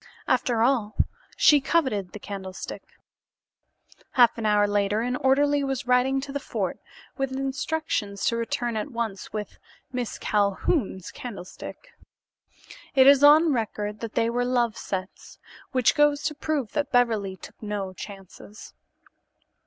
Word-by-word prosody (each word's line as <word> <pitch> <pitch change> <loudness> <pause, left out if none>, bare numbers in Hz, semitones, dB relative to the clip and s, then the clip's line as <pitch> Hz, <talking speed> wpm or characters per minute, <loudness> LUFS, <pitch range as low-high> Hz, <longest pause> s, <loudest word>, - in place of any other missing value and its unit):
After 230 -3 +2
all, 235 -5 +1 0.4
she 295 -2 +6
coveted 260 - 0
the - - -6
candlestick. 190 -2 -7 1.3
Half 240 -3 +5
an 220 - 0
hour 205 -1 +4
later 205 +1 +1
an 250 +2 -1
orderly 285 +2 +2
was 270 -2 -2
riding 250 +2 +3
to 275 +1 -7
the 285 - -2
fort - - -3 0.4
with 270 -1 -1
instructions 270 -6 -2
to 230 - +2
return 235 0 -2
at 215 +6 -3
once 230 -6 -4
with 210 -1 -6 0.3
Miss 250 -3 -3
Calhoun's 200 - 0
candlestick. 245 - -9 1.0
It 265 -1 +7
is 280 0 +7
on 305 +2 +7
record 210 -3 -3
that 230 -2 -6
they 230 - +2
were 240 +1 0
"love" 240 -3 +1
sets, 190 -4 -6 0.3
which 255 -2 +3
goes 295 -1 +3
to 300 - -1
prove 290 -6 -2
that 290 -2 -2
Beverly 220 -6 +1
took - - -13
no 205 -3 -4
chances. 195 +2 -11
235 Hz, 135 wpm, -25 LUFS, 205-270 Hz, 1.3 s, It